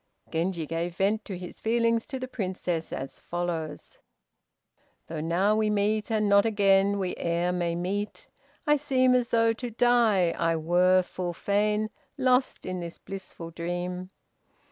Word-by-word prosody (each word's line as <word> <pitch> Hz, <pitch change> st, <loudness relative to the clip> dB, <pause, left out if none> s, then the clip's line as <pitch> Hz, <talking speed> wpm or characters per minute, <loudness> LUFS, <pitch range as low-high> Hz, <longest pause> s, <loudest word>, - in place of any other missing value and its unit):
Genji 170 Hz, 0 st, -1 dB
gave 165 Hz, +2 st, -3 dB
vent 205 Hz, +3 st, +1 dB
to 190 Hz, -, -5 dB
his 180 Hz, -1 st, -9 dB
feelings 230 Hz, 0 st, +1 dB
to 265 Hz, -, -4 dB
the 255 Hz, 0 st, -5 dB
Princess, 185 Hz, -7 st, -3 dB
as 135 Hz, -, -6 dB
follows: 170 Hz, -3 st, -4 dB, 1.1 s
"Though 160 Hz, -1 st, -5 dB
now 180 Hz, +6 st, +2 dB
we 215 Hz, 0 st, +2 dB
meet, 210 Hz, +1 st, +1 dB
and 215 Hz, -2 st, +1 dB
not 200 Hz, 0 st, +6 dB
again 200 Hz, -2 st, +3 dB
We 185 Hz, -2 st, -2 dB
e'er 170 Hz, +1 st, 0 dB
may 175 Hz, -1 st, -1 dB
meet, 195 Hz, +4 st, -3 dB, 0.4 s
I 295 Hz, -1 st, +4 dB
seem 260 Hz, -3 st, +3 dB
As 245 Hz, -1 st, +2 dB
though 230 Hz, -1 st, +3 dB
to 245 Hz, +2 st, -5 dB
die, 230 Hz, -6 st, +3 dB
I 165 Hz, 0 st, 0 dB
were 180 Hz, +3 st, +3 dB
full 180 Hz, -1 st, -4 dB
fain 210 Hz, +3 st, 0 dB, 0.3 s
Lost 255 Hz, -1 st, +2 dB
in 185 Hz, -1 st, -3 dB
this 170 Hz, -1 st, -6 dB
blissful 185 Hz, -3 st, -8 dB
dream." 175 Hz, +2 st, -4 dB
195 Hz, 150 wpm, -27 LUFS, 175-220 Hz, 1.1 s, not